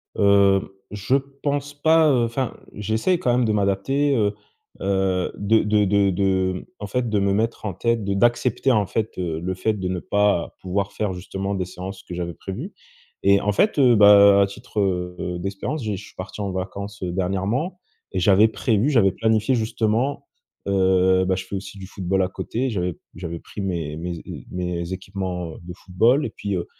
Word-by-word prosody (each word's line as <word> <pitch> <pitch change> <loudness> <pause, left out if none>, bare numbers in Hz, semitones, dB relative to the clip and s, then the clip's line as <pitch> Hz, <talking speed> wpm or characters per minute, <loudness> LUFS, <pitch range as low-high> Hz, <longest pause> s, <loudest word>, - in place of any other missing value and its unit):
Hem, 100 -1 +4 0.2
je 105 +5 0
pense 140 +1 -2
pas, 160 +2 +4
heu, 120 -3 +3
enfin 120 +2 -3 0.2
j'essaie 110 - 0
quand 125 -9 +1
même 125 -1 +2
de 110 - +1
m'adapter, 105 +8 +1
heu, 105 -4 +1 0.5
heu, 95 -2 0
de 110 +2 +3
de 105 0 +2
de 100 0 +3
de 95 -1 0
en 105 - -5
fait 120 +3 -1
de 105 -2 +1
me 100 0 +1
mettre 110 +2 -1
en 100 - -2
tête 115 +3 0
de 100 - 0
d'accepter 120 +4 +2
en 105 -4 +3
fait, 110 +1 -3
heu, 85 -3 -2
le 90 +3 -3
fait 110 +4 0
de 95 -3 -4
ne 90 -1 -2
pas 100 -4 +1
pouvoir 95 +2 -2
faire 105 -3 -2
justement 95 +2 -4
des 95 - -2
séances 95 +2 -8
que 90 - -8
j'avais 85 -1 -4
prévu 95 +2 -7 0.5
et 100 0 +5
en 105 - +1
fait, 175 - +2
heu, 125 -3 +6
bah 100 -1 +7
à - - +5
titre 100 +2 -7
heu, 90 -2 -2
d'expérience 100 - -4
j'ai 105 -3 -2
je 105 - -10
suis - - -17
parti 95 +3 -8
en 100 -1 -2
vacances, 100 +2 -5
heu, 90 - -2
dernièrement 95 - -1 0.3
et 95 - 0
j'avais 100 +4 +5
prévu, 110 +2 +1
j'avais 115 -9 +4
planifié 110 +4 +1
justement, 115 +4 0 0.4
heu, 95 -1 +3
bah 95 0 +1
je 95 0 -5
fais 100 - -6
aussi 95 +1 -7
du 95 -1 -8
football 95 0 -1
à 90 - -1
côté 125 +6 -3
j'avais 90 -6 -2
p - - -27 0.2
j'avais 85 -1 -6
pris - - -11
mes 85 -6 -3
mes 85 +1 -4
é - - -8
heu, - - -9
mes 90 0 -3
équipements, 95 -3 -5
heu, - - -11
de 90 0 -8
football 115 +11 +2
et - - -2
puis, 100 -2 -4
heu, 85 - -2
100 Hz, 200 wpm, -23 LUFS, 95-110 Hz, 0.5 s, bah